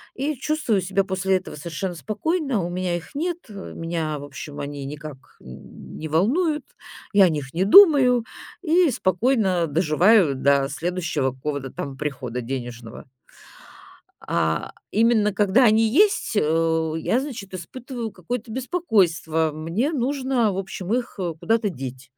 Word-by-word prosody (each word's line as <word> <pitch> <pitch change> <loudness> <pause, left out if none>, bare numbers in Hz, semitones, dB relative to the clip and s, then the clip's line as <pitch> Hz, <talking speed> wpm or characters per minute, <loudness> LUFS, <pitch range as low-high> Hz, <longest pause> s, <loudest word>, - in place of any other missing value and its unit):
и 290 +3 -2
чувствую 270 -6 0
себя 195 +2 0
после 190 0 0
этого 185 - -9
совершенно 170 +4 -4
спокойно. 265 - -1
У 170 - -3
меня 180 0 -2
их 175 - -12
нет, 340 +3 -1
э, 200 -2 -8
меня, 165 -2 -3
в - - -8
общем, 145 +1 -9
они 145 -1 -6
никак, 150 0 -7 0.2
э, - - -19
не 65 - -10
волнуют, 285 - +1 0.5
я 200 -1 +7
о - - +3
них 145 -4 -4
не 180 +3 +1
думаю 260 - +7 0.4
и 340 0 +4
спокойно 190 -4 +1
доживаю 165 +2 +3
до 140 +1 +2
следующего 160 -3 -2
какого-то 135 0 -4
там 135 -1 -6
прихода 130 -5 -4
денежного. 120 -2 -7 1.2
А 80 -1 -1 0.2
именно 220 -1 +3
когда 205 +6 +4
они 220 0 +4
есть, 405 0 +3
э, 160 -1 +1
я, 225 +9 +1
значит, 240 -9 -7
испытываю 235 +6 -6
какое-то 225 +5 -5
беспокойство. 185 - +1
Мне 170 - -1
нужно, 260 -5 0
в - - -5
общем, 190 +1 -4
их, 245 -1 -2
э, 175 -3 -2
куда-то 225 +2 +1
деть. 130 -4 -8
185 Hz, 145 wpm, -23 LUFS, 155-240 Hz, 1.2 s, я